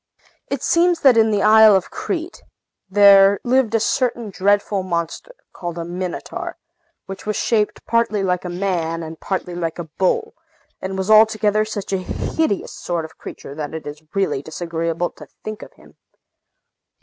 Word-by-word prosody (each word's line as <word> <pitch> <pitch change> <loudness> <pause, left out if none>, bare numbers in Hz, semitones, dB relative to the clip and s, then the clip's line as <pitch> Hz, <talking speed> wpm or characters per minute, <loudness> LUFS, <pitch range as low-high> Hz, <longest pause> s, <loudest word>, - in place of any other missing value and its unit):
It - - -3
seems 340 0 +3
that 265 -4 +6
in 225 -1 +4
the 205 -2 +1
island 215 -1 +7
of 190 - -5
Crete 365 -5 -4 0.5
there 200 0 +6
lived 245 -2 +2
a - - +3
certain 240 -2 -1
dreadful 200 +1 +1
monster, 180 - -4 0.2
called 175 -1 -6
a 170 - -4
Minotaur, 180 +1 -5 0.5
which 195 +1 -9
was 215 - -1
shaped 210 -1 0
partly 230 -3 +1
like 180 -2 0
a 180 - -5
man 175 -3 -2
and 160 0 -8
partly 185 -2 -3
like 165 -2 -3
a 175 - -4 0.2
bull, 185 - +1 0.5
and 190 0 -4
was 190 +2 -1
altogether 215 -1 +4
such 205 -2 -5
a 190 - +1
hideous 200 +4 -2
sort 170 -2 -3
of 160 - -11
a - - -27
creature 140 - -9
that 150 +1 -5
it 160 - -7
is 150 +1 -8
really 195 -8 0
disagreeable 165 +2 -3
to - - -13 0.2
think 215 0 -6
of - - -11
him. - - -20
195 Hz, 170 wpm, -20 LUFS, 175-215 Hz, 0.5 s, island